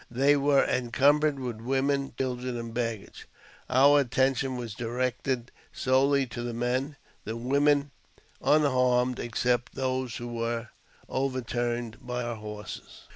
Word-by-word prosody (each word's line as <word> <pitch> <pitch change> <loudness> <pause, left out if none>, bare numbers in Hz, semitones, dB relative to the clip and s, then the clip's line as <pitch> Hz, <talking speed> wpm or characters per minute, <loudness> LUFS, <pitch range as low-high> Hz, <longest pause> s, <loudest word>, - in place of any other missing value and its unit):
They 135 +4 +3
were 140 0 +3
encumbered 140 +4 +2
with 120 -4 -5
women, 135 +2 0
children, 125 -1 -2
and 115 -1 -6
baggage. 115 -3 -4 0.4
Our 140 +3 +6
attention 130 0 +1
was 120 -3 -5
directed 125 +2 -2 0.2
solely 135 +1 +2
to 120 0 -6
the 120 -1 -4
men; 130 +5 -1 0.3
the 110 +2 -4
women 140 +3 +2 0.5
were - - +4
unharmed, 125 -4 +2
except 120 +1 -1
those 130 -2 -2
who 120 - -5
were 115 -1 -3 0.4
overturned 120 -3 -2
by 125 0 -3
our 120 -1 -4
horses. 105 -1 -9
125 Hz, 130 wpm, -28 LUFS, 120-135 Hz, 0.5 s, Our